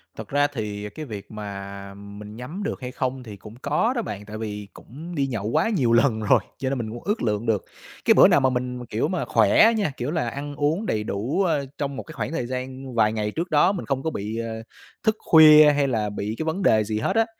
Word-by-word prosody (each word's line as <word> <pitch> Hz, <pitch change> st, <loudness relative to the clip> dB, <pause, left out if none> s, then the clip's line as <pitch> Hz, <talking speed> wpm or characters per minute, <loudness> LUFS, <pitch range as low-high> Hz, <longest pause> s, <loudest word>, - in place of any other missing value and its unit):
Thật -, -, -8 dB
ra 145 Hz, +1 st, +3 dB
thì 105 Hz, -3 st, -4 dB
cái 155 Hz, +9 st, -8 dB
việc 105 Hz, -7 st, -8 dB
mà 100 Hz, -2 st, -7 dB
mình 100 Hz, +1 st, -10 dB
nhắm 150 Hz, -, -6 dB
được 205 Hz, -, -4 dB
hay 125 Hz, 0 st, -5 dB
không 130 Hz, 0 st, -3 dB
thì 105 Hz, -4 st, -9 dB
cũng 105 Hz, +3 st, -12 dB
có 185 Hz, -, +1 dB
đó 235 Hz, -, 0 dB
bạn, 105 Hz, -, -6 dB
tại 105 Hz, +1 st, -7 dB
vì 105 Hz, -2 st, -5 dB
cũng 160 Hz, +8 st, -10 dB
đi 140 Hz, -3 st, 0 dB
nhậu 110 Hz, -6 st, -4 dB
quá 115 Hz, -, +1 dB
nhiều 130 Hz, -, +2 dB
lần 115 Hz, -1 st, +3 dB
rồi, 110 Hz, +3 st, +4 dB, 0.2 s
cho 130 Hz, 0 st, -2 dB
nên 135 Hz, -, -1 dB
mình 115 Hz, -3 st, -4 dB
cũng 120 Hz, +1 st, -8 dB
ước 210 Hz, +3 st, -1 dB
lượng 105 Hz, 0 st, -1 dB
được. 110 Hz, -4 st, +1 dB, 0.4 s
Cái -, -, +6 dB
bữa -, -, +8 dB
nào -, -, +4 dB
mà 130 Hz, -1 st, +3 dB
mình 125 Hz, -1 st, -3 dB
kiểu 110 Hz, -1 st, -1 dB
mà 180 Hz, -, -2 dB
khỏe 225 Hz, +1 st, +5 dB
nha, 200 Hz, -8 st, 0 dB
kiểu 125 Hz, +4 st, -3 dB
là, 155 Hz, -8 st, -1 dB
ăn 145 Hz, +3 st, -6 dB
uống 150 Hz, +9 st, 0 dB
đầy 110 Hz, -, -1 dB
đủ, 115 Hz, -, -1 dB
ơ, 155 Hz, -6 st, 0 dB
trong 140 Hz, -1 st, -3 dB
một -, -, -5 dB
cái 160 Hz, -, -11 dB
khoảng -, -, -4 dB
thời 160 Hz, -7 st, -2 dB
gian 130 Hz, 0 st, -6 dB
vài 110 Hz, -1 st, +3 dB
ngày 105 Hz, -1 st, -2 dB
trước 170 Hz, -, -3 dB
đó 155 Hz, +5 st, +5 dB
mình 190 Hz, -4 st, -4 dB
không 135 Hz, -1 st, -2 dB
có 160 Hz, -, 0 dB
bị, 110 Hz, -5 st, -4 dB
ờ, 115 Hz, -1 st, -4 dB, 0.4 s
thức 220 Hz, -2 st, +2 dB
khuya 155 Hz, -2 st, +8 dB
hay 145 Hz, -1 st, +1 dB
là 110 Hz, -5 st, -1 dB
bị 105 Hz, +1 st, -4 dB
cái -, -, -2 dB
vấn 160 Hz, +5 st, -2 dB
đề 110 Hz, -10 st, +4 dB
gì 105 Hz, 0 st, -2 dB
hết -, -, -1 dB
á, 225 Hz, 0 st, +4 dB
125 Hz, 255 wpm, -24 LUFS, 105-150 Hz, 0.4 s, bữa